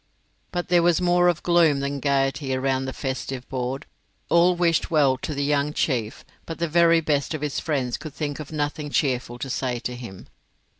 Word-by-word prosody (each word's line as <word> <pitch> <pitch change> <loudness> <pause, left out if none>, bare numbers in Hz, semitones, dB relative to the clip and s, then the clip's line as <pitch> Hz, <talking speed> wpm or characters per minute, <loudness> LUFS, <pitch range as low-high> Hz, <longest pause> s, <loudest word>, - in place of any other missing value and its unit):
But 175 0 -3
there 175 -1 +5
was 170 -1 +3
more 175 0 +3
of 175 -1 +1
gloom 170 -5 +4
than 140 +1 -2
of - - -8
gaiety 135 -1 0
around 130 0 0
the 130 - -3
festive 130 -1 -4
board. 130 +2 -3 0.4
All 175 +1 +4
wished 170 -1 +1
well 145 -5 +3
to 150 - -4
the 140 - -1
young 145 +1 +1
chief, 120 -8 -1 0.2
but 165 - -5
the 170 - -1
very 170 +1 +4
best 150 0 0
of 155 - -6
his 150 -2 -2
friends 135 -6 -1
could 150 -2 -9
think 145 -2 -3
of 150 -1 -8
nothing 150 0 -3
cheerful 125 -4 -1
to 130 - -5
say 125 -2 -1
to 125 - -4
him. 115 -7 -9
145 Hz, 200 wpm, -24 LUFS, 130-165 Hz, 0.4 s, there